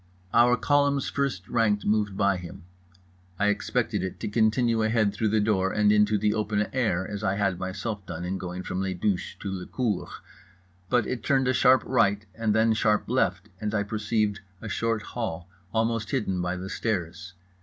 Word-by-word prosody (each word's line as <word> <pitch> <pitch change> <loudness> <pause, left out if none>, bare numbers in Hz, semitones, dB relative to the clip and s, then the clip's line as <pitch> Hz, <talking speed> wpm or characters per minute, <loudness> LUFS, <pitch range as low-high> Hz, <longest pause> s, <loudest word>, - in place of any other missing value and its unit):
Our 120 +1 +5
column's 140 -1 +2
first 130 -10 -2
rank 105 -3 +1
moved 105 -2 +1
by 100 -2 +2
him. 90 -2 -9 0.7
I 105 - +2
expected 110 0 -1
it 95 0 -5
to - - -2
continue 110 +2 +2
ahead 110 -2 +2
through 110 - 0
the 110 +1 +2
door 100 -3 +1
and 105 -1 +3
into 105 0 +4
the 105 +1 +1
open 105 -1 0
air, 100 -8 0
as 105 0 -5
I 95 -1 +1
had 100 -3 0
myself 95 +3 -4
done 85 0 -5
in 95 +1 -3
going 90 0 -5
from 90 - -3
les 95 -1 -2
douches 90 +1 -1
to 100 - -4
le 95 -2 -5
cour; 115 -7 -2 0.8
but 120 -1 +2
it 125 - -3
turned 135 -3 +2
a 130 - +3
sharp 130 +1 +5
right 105 -5 +2
and 110 -1 0
then 110 0 +4
sharp 105 -1 +1
left, 95 -5 0
and 105 0 -2
I 105 - +1
perceived 105 0 -1 0.2
a 110 - -7
short 115 0 -1
hall, 90 -8 -5 0.2
almost 115 -1 0
hidden 95 -9 -1
by 90 +1 -1
the 90 +1 -6
stairs. 90 -5 -3
105 Hz, 185 wpm, -26 LUFS, 95-115 Hz, 0.8 s, Our